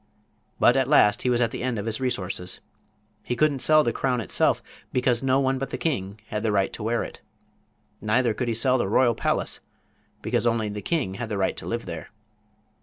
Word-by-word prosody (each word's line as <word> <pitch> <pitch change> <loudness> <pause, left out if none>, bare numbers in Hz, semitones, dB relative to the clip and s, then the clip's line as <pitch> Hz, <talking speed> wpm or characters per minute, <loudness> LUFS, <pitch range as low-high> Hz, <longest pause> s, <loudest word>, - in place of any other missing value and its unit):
But 120 - +5
at 135 -1 +2
last 105 -8 +4
he 125 - 0
was 120 0 +2
at 115 -1 +2
the - - -5
end 125 -2 -1
of 100 - -4
his 115 +2 -3
resources. 95 -7 -1 0.6
He 120 - -3
couldn't 150 0 +2
sell 155 +3 +5
the 120 - 0
crown 130 -2 0
itself, 105 - +1 0.3
because 125 -2 +1
no 135 0 +2
one 135 -1 +1
but 135 - -3
the - - -4
king 100 - -2
had 105 - -2
the 110 -1 0
right 100 -2 +1
to - - -6
wear 115 +2 0
it. - - -9 0.8
Neither 115 +2 +2
could 125 +2 -3
he 115 - 0
sell 130 +3 +2
the 95 - 0
royal 120 +4 +3
palace, - - -1 0.6
because - - 0
only 115 -2 +1
the 105 0 -5
king 150 - -1
had 115 +3 -5
the 105 - -2
right 95 - 0
to - - -7
live 115 0 -3
there. 85 -3 -7
120 Hz, 215 wpm, -25 LUFS, 105-130 Hz, 0.8 s, But